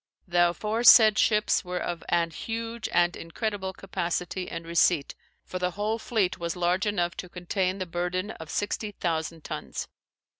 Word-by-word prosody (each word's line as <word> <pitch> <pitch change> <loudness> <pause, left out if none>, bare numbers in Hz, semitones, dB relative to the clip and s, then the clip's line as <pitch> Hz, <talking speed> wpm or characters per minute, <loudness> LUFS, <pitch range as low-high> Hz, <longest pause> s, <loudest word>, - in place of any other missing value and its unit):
The 175 0 +4
aforesaid 215 +3 +6
ships 210 -1 +3
were 180 -1 -4
of 175 -2 -3
an 170 -1 +2
huge 230 +4 -4
and 175 0 +3
incredible 190 +2 -3
capacitie 180 -1 -3
and 165 0 -6
receipt: 170 -3 +2 0.3
for 185 - -5
the 180 0 +1
whole 215 +2 -1
fleete 200 -6 0
was 170 0 -3
large 180 +3 +1
enough 175 -4 0
to 180 - -6
contains 185 +2 -1
the 185 - -3
burthen 180 +3 -2
of 160 -6 -10
60,000 170 -6 -2
tunnes. - - -5
180 Hz, 150 wpm, -27 LUFS, 175-205 Hz, 0.3 s, aforesaid